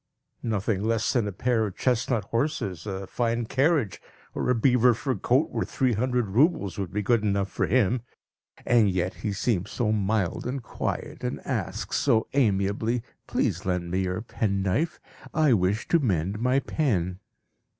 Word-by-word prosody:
Nothing 105 Hz, -3 st, -1 dB
less 115 Hz, 0 st, +1 dB
than 120 Hz, -5 st, +1 dB
a -, -, -2 dB
pair 110 Hz, +2 st, +1 dB
of 95 Hz, -, -9 dB
chestnut 125 Hz, -2 st, +1 dB
horses, 110 Hz, -, -2 dB
a 95 Hz, -1 st, -4 dB
fine 115 Hz, +2 st, -1 dB
carriage, 135 Hz, -, +1 dB, 0.3 s
or -, -, -2 dB
a 125 Hz, -, +4 dB
beaver 125 Hz, 0 st, +4 dB
fur 130 Hz, +3 st, -1 dB
coat 125 Hz, -, +1 dB
worth -, -, -2 dB
three 130 Hz, -3 st, +1 dB
hundred 125 Hz, 0 st, 0 dB
roubles 115 Hz, -, +2 dB
would 95 Hz, -3 st, -3 dB
be 105 Hz, +2 st, -1 dB
good 115 Hz, +2 st, +3 dB
enough 100 Hz, -2 st, 0 dB
for -, -, 0 dB
him. 120 Hz, +1 st, +2 dB, 0.6 s
And 115 Hz, -4 st, +4 dB
yet 90 Hz, +1 st, -1 dB
he 105 Hz, -, -4 dB
seems 100 Hz, -2 st, -1 dB
so 110 Hz, -3 st, 0 dB
mild 105 Hz, -1 st, 0 dB
and 130 Hz, 0 st, -3 dB
quiet, -, -, -4 dB
and -, -, -2 dB
asks -, -, -2 dB
so 115 Hz, -6 st, +3 dB
amiably, 110 Hz, -1 st, +1 dB, 0.2 s
"Please 90 Hz, -, 0 dB
lend 90 Hz, -3 st, -2 dB
me 95 Hz, -, +1 dB
your 95 Hz, +1 st, -1 dB
penknife; 100 Hz, -, -1 dB, 0.4 s
I 155 Hz, -4 st, +4 dB
wish 100 Hz, +2 st, +1 dB
to 170 Hz, -, +4 dB
mend 100 Hz, -, 0 dB
my 125 Hz, +3 st, +2 dB
pen." 95 Hz, -, -1 dB
110 Hz, 165 wpm, -26 LUFS, 95-125 Hz, 0.6 s, a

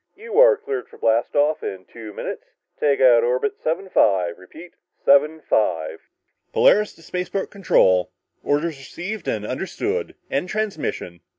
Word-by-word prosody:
"You 445 Hz, +2 st, -2 dB
are -, -, +7 dB
cleared 425 Hz, -2 st, -5 dB
for -, -, -15 dB
blast 115 Hz, +1 st, +1 dB
off 150 Hz, +2 st, +2 dB
in 95 Hz, -1 st, -6 dB
two 110 Hz, -2 st, -10 dB
minutes. -, -, -6 dB, 0.4 s
Take 145 Hz, -2 st, +2 dB
out 120 Hz, -3 st, +6 dB
orbit 125 Hz, -, 0 dB
75... 105 Hz, -, +1 dB
repeat... 160 Hz, -, -13 dB, 0.3 s
75...." 110 Hz, -, +2 dB, 0.5 s
"Polaris 210 Hz, +1 st, +4 dB
to 165 Hz, -, -19 dB
spaceport 180 Hz, +3 st, -4 dB
control. 95 Hz, -, +3 dB, 0.3 s
Orders 145 Hz, +1 st, -1 dB
received 180 Hz, +8 st, -7 dB
and 105 Hz, -1 st, -2 dB
understood. 190 Hz, -, -3 dB, 0.2 s
End 180 Hz, -, -1 dB
transmission!" 195 Hz, -, -3 dB
150 Hz, 130 wpm, -22 LUFS, -, 0.5 s, are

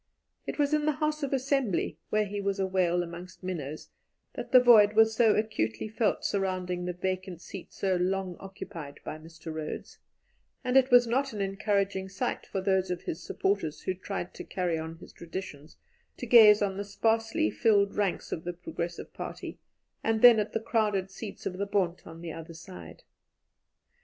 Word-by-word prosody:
It -, -, -4 dB
was 290 Hz, 0 st, +1 dB
in 300 Hz, 0 st, +2 dB
the 305 Hz, -, +3 dB
House 305 Hz, +1 st, -1 dB
of 280 Hz, -, -2 dB
Assembly 270 Hz, -6 st, 0 dB
where 215 Hz, 0 st, +2 dB
he 205 Hz, 0 st, -4 dB
was 200 Hz, 0 st, -1 dB
a 190 Hz, -, +2 dB
whale 180 Hz, -2 st, +1 dB
amongst 175 Hz, +2 st, -10 dB
minnows 155 Hz, -5 st, -5 dB, 0.4 s
that -, -, -7 dB
the 255 Hz, -, +9 dB
void 220 Hz, -4 st, +7 dB
was 220 Hz, 0 st, +5 dB
so 225 Hz, -2 st, +5 dB
acutely 210 Hz, -, -1 dB
felt 220 Hz, 0 st, 0 dB
surrounding 185 Hz, -2 st, -1 dB
the 180 Hz, -, -2 dB
vacant 185 Hz, -1 st, -3 dB
seat 190 Hz, +1 st, -9 dB
so 190 Hz, -2 st, 0 dB
long 185 Hz, 0 st, -1 dB
occupied 165 Hz, -6 st, -8 dB
by 155 Hz, -, -6 dB
Mr. 160 Hz, 0 st, -9 dB
Rhodes, 155 Hz, -1 st, -6 dB, 0.6 s
and 250 Hz, 0 st, -1 dB
it 265 Hz, -1 st, +6 dB
was 245 Hz, 0 st, +7 dB
not 265 Hz, +2 st, 0 dB
an 205 Hz, -, -3 dB
encouraging 195 Hz, -1 st, 0 dB
sight, 190 Hz, -, -3 dB
for 190 Hz, -, -3 dB
those 190 Hz, -1 st, +1 dB
of 180 Hz, -1 st, -3 dB
his 165 Hz, -, -4 dB
supporters 190 Hz, -4 st, -1 dB
who 185 Hz, -, -1 dB
tried 185 Hz, -1 st, -5 dB
to -, -, -8 dB
carry 175 Hz, -4 st, -1 dB
on 160 Hz, +1 st, -6 dB
his -, -, -14 dB
traditions, 165 Hz, -3 st, -8 dB, 0.4 s
to 245 Hz, -, -5 dB
gaze 215 Hz, -3 st, +8 dB
on 195 Hz, -1 st, -1 dB
the 200 Hz, -, -2 dB
sparsely 225 Hz, -, +1 dB
filled 200 Hz, -, +3 dB
ranks 200 Hz, -3 st, -1 dB
of 160 Hz, -, -3 dB
the 175 Hz, -, -4 dB
Progressive 170 Hz, 0 st, -6 dB
Party, -, -, -7 dB, 0.4 s
and 225 Hz, -1 st, 0 dB
then 240 Hz, -3 st, +9 dB
at 210 Hz, -, -1 dB
the 225 Hz, -, +1 dB
crowded 210 Hz, -4 st, 0 dB
seats 205 Hz, +1 st, -8 dB
of 185 Hz, 0 st, -4 dB
the 200 Hz, -, -1 dB
Bond 185 Hz, -4 st, 0 dB
on 165 Hz, 0 st, -10 dB
the 165 Hz, -2 st, -6 dB
other 165 Hz, 0 st, -9 dB
side. 180 Hz, +3 st, -11 dB
195 Hz, 185 wpm, -29 LUFS, 175-220 Hz, 0.6 s, the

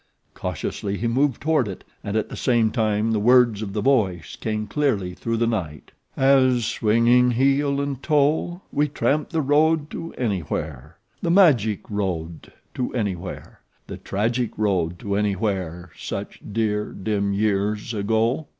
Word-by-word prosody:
Cautiously 100 Hz, 0 st, -4 dB
he 115 Hz, -, -3 dB
moved 130 Hz, +1 st, +1 dB
toward 155 Hz, -6 st, +2 dB
it, 95 Hz, -, -7 dB, 0.2 s
and 100 Hz, +2 st, -2 dB
at 110 Hz, -, 0 dB
the -, -, -7 dB
same 115 Hz, -3 st, +2 dB
time 110 Hz, -1 st, +1 dB
the 110 Hz, -, +1 dB
words 120 Hz, -1 st, +4 dB
of 100 Hz, -3 st, -5 dB
the 105 Hz, -, -2 dB
voice 95 Hz, -, +1 dB
came 110 Hz, -1 st, -3 dB
clearly 105 Hz, -9 st, 0 dB
through 115 Hz, +5 st, -3 dB
the 115 Hz, -, +2 dB
night: 85 Hz, -11 st, -3 dB, 0.2 s
"'... -, -, -42 dB
as, 130 Hz, -3 st, +4 dB
swinging 115 Hz, +4 st, +3 dB
heel 140 Hz, +3 st, +2 dB
and 140 Hz, -2 st, -3 dB
toe, 155 Hz, +5 st, +1 dB
'We 150 Hz, +1 st, +1 dB
tramped 150 Hz, +1 st, 0 dB
the 160 Hz, -3 st, 0 dB
road 150 Hz, +2 st, +2 dB
to 165 Hz, 0 st, -6 dB
Anywhere, 80 Hz, -, -3 dB, 0.2 s
the 170 Hz, -, -1 dB
magic 125 Hz, -, +4 dB
road 85 Hz, -6 st, -4 dB, 0.2 s
to 125 Hz, -, -2 dB
Anywhere, 95 Hz, -6 st, -4 dB, 0.3 s
'The -, -, -7 dB
tragic 115 Hz, +4 st, -2 dB
road 90 Hz, -5 st, 0 dB
to 100 Hz, +2 st, -3 dB
Anywhere, 95 Hz, -4 st, -2 dB
such -, -, -6 dB
dear, 105 Hz, -1 st, -1 dB
dim 100 Hz, 0 st, -1 dB
years 105 Hz, +2 st, 0 dB
ago.'" 115 Hz, +7 st, 0 dB
110 Hz, 150 wpm, -23 LUFS, 100-135 Hz, 0.3 s, words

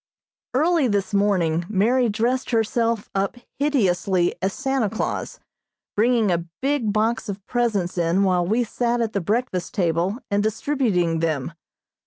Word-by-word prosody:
Early 320 Hz, 0 st, +3 dB
this 205 Hz, -2 st, -1 dB
morning 180 Hz, -5 st, +2 dB
Mary 230 Hz, +5 st, +2 dB
dressed 240 Hz, +5 st, 0 dB
herself 230 Hz, -1 st, 0 dB
up 195 Hz, +4 st, -1 dB, 0.2 s
hideously 190 Hz, -10 st, +2 dB
as 190 Hz, +1 st, 0 dB
Santa 265 Hz, -2 st, -1 dB
Claus, 220 Hz, -, -3 dB, 0.6 s
bringing 225 Hz, -2 st, +3 dB
a 170 Hz, 0 st, -1 dB
big 270 Hz, -5 st, 0 dB
box 220 Hz, +2 st, 0 dB
of 200 Hz, 0 st, -6 dB
presents 210 Hz, -8 st, 0 dB
in 170 Hz, +3 st, +2 dB
while 180 Hz, -2 st, +2 dB
we 220 Hz, +7 st, +1 dB
sat 240 Hz, +1 st, -1 dB
at 225 Hz, -2 st, -1 dB
the 200 Hz, -, 0 dB
breakfast 200 Hz, -2 st, -2 dB
table 175 Hz, +2 st, +1 dB
and 200 Hz, 0 st, +2 dB
distributing 215 Hz, -, 0 dB
them. 160 Hz, -2 st, -1 dB
210 Hz, 140 wpm, -23 LUFS, 185-240 Hz, 0.6 s, Early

